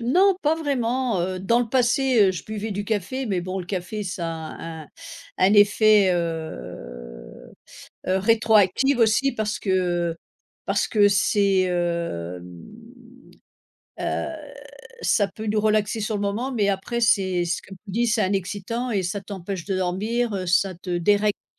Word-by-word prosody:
non, 360 Hz, +11 st, +3 dB
pas 305 Hz, +2 st, +3 dB
vraiment, 255 Hz, -, -1 dB
heu. 185 Hz, +1 st, -3 dB
Dans 230 Hz, +5 st, +2 dB
le 240 Hz, -2 st, -1 dB
passé, 245 Hz, -3 st, +3 dB
heu, -, -, +1 dB
je 175 Hz, -, -7 dB
buvais 215 Hz, 0 st, -5 dB
du 205 Hz, +1 st, -3 dB
café, 220 Hz, +6 st, -2 dB
mais 190 Hz, -4 st, -1 dB
bon 185 Hz, +2 st, -4 dB
le 180 Hz, -, -5 dB
café 190 Hz, +3 st, -4 dB
ça 180 Hz, -3 st, -4 dB
a 160 Hz, -1 st, -7 dB, 0.2 s
un -, -, -15 dB, 0.5 s
un 190 Hz, +3 st, +4 dB
effet, 205 Hz, -1 st, +5 dB
heu -, -, -6 dB, 0.6 s
heu, 185 Hz, +1 st, +2 dB
rétroactive 225 Hz, +4 st, +3 dB
aussi 230 Hz, +5 st, +3 dB
parce 215 Hz, 0 st, -2 dB
que, 195 Hz, -, -5 dB, 0.4 s
heu, 165 Hz, -, -9 dB, 0.5 s
parce -, -, 0 dB
que 205 Hz, -2 st, +4 dB
c'est, 200 Hz, -1 st, +2 dB
hem. 90 Hz, -, -3 dB, 1.4 s
Heu, -, -, -1 dB, 0.8 s
ça 205 Hz, -3 st, +2 dB
peut 215 Hz, +3 st, -8 dB
nous 215 Hz, 0 st, +1 dB
relaxer 215 Hz, +1 st, +1 dB
sur 215 Hz, 0 st, -2 dB
le -, -, -3 dB
moment, 215 Hz, +6 st, -2 dB
mais 205 Hz, -4 st, +1 dB
après 200 Hz, +5 st, -2 dB
c'est, 190 Hz, -6 st, +2 dB
ce 175 Hz, -, -2 dB
qu'on 195 Hz, -, -11 dB
nous 195 Hz, -, -8 dB
dit 235 Hz, +4 st, +1 dB
c'est 220 Hz, -1 st, +2 dB
un 190 Hz, -, 0 dB
excitant, 205 Hz, +6 st, -3 dB
et 195 Hz, -4 st, 0 dB
ça 195 Hz, +3 st, -3 dB
t'empêche 190 Hz, -2 st, -6 dB
de 195 Hz, -2 st, -2 dB
dormir, 210 Hz, +5 st, -1 dB
heu, 185 Hz, -1 st, -3 dB
ça 185 Hz, +2 st, +2 dB
te 180 Hz, +1 st, -9 dB
dérègle 205 Hz, +3 st, +2 dB
un -, -, -67 dB
200 Hz, 165 wpm, -23 LUFS, 185-225 Hz, 1.4 s, effet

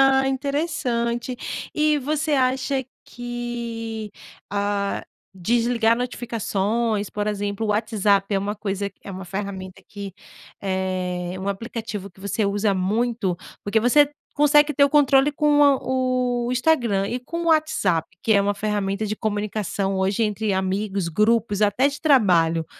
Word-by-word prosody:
Ah, 270 Hz, 0 st, +5 dB
interessante 260 Hz, -4 st, -1 dB, 0.4 s
e 305 Hz, -1 st, +3 dB
você 305 Hz, +2 st, -1 dB
acha 265 Hz, 0 st, +1 dB, 0.2 s
que, 235 Hz, -3 st, -5 dB, 0.4 s
hã, 200 Hz, 0 st, -1 dB, 0.3 s
desligar 230 Hz, +4 st, +2 dB
notificações, 225 Hz, -3 st, -1 dB
por 210 Hz, 0 st, -3 dB
exemplo, 205 Hz, +1 st, -2 dB
o -, -, -4 dB
WhatsApp 205 Hz, -2 st, +2 dB
é -, -, +3 dB
uma 200 Hz, +2 st, -2 dB
coisa 200 Hz, -1 st, -3 dB
que -, -, -40 dB
é 200 Hz, -, -7 dB
uma 190 Hz, 0 st, -7 dB
ferramenta 190 Hz, 0 st, -6 dB
que 200 Hz, -2 st, -7 dB, 0.5 s
é 185 Hz, -2 st, -2 dB
um 195 Hz, -, -3 dB
aplicativo 215 Hz, -1 st, -5 dB
que 190 Hz, -, -21 dB
você 200 Hz, +2 st, -1 dB
usa 200 Hz, 0 st, +1 dB
muito? 200 Hz, 0 st, 0 dB, 0.3 s
Porque 210 Hz, +2 st, +1 dB
você 280 Hz, +5 st, +5 dB, 0.3 s
consegue 295 Hz, +1 st, +5 dB
ter 280 Hz, +1 st, +4 dB
o 280 Hz, -, +2 dB
controle 280 Hz, -1 st, +4 dB
com 295 Hz, 0 st, +3 dB, 0.2 s
o 255 Hz, -1 st, 0 dB, 0.2 s
o -, -, 0 dB
Instagram 240 Hz, -8 st, +2 dB
e 245 Hz, +3 st, -3 dB
com 335 Hz, +6 st, -5 dB
o -, -, -3 dB
WhatsApp, 310 Hz, -, +2 dB
que 220 Hz, -, +3 dB
é 200 Hz, -, +5 dB
uma 205 Hz, +1 st, 0 dB
ferramenta 205 Hz, 0 st, -1 dB
de 215 Hz, -, -2 dB
comunicação 205 Hz, -2 st, -2 dB
hoje 195 Hz, +4 st, +1 dB
entre 210 Hz, 0 st, -1 dB
amigos, 190 Hz, 0 st, -1 dB
grupos, 215 Hz, +2 st, +2 dB
até 210 Hz, +7 st, +3 dB
de 285 Hz, +1 st, -3 dB
trabalho, 175 Hz, -, +3 dB
215 Hz, 145 wpm, -23 LUFS, 200-255 Hz, 0.5 s, Ah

